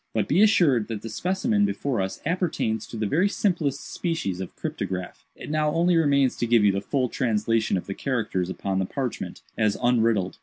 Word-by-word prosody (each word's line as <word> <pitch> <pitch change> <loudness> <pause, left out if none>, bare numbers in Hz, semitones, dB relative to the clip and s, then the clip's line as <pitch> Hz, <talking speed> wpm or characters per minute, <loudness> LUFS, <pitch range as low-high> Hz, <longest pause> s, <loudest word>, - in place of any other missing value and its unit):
But - - +1
be 175 +7 +3
assured 165 - +4
that 110 -3 -5
the 115 - -5
specimen 195 - 0
before 140 - 0
us 95 0 -4
appertains 160 - -1
to 115 - -8
the 110 - -1
very 170 - +2
simplest 165 -10 -1
species 160 - -2
of 95 - -7
cryptograph. 90 -1 -5
It - - -8
now 155 0 +1
only 175 +1 +3
remains 140 -5 +3
to 120 - -1
give 115 -2 +4
you 100 - +5
the 100 0 -2
full 130 +4 0
translation 115 -3 0
of 90 - -5
the 100 - -4
characters 110 -8 -2
upon 95 0 -2
the 95 - 0
parchment, 130 0 -4 0.2
as 105 -2 +2
unriddled. 115 -6 +1
120 Hz, 195 wpm, -25 LUFS, 105-165 Hz, 0.2 s, you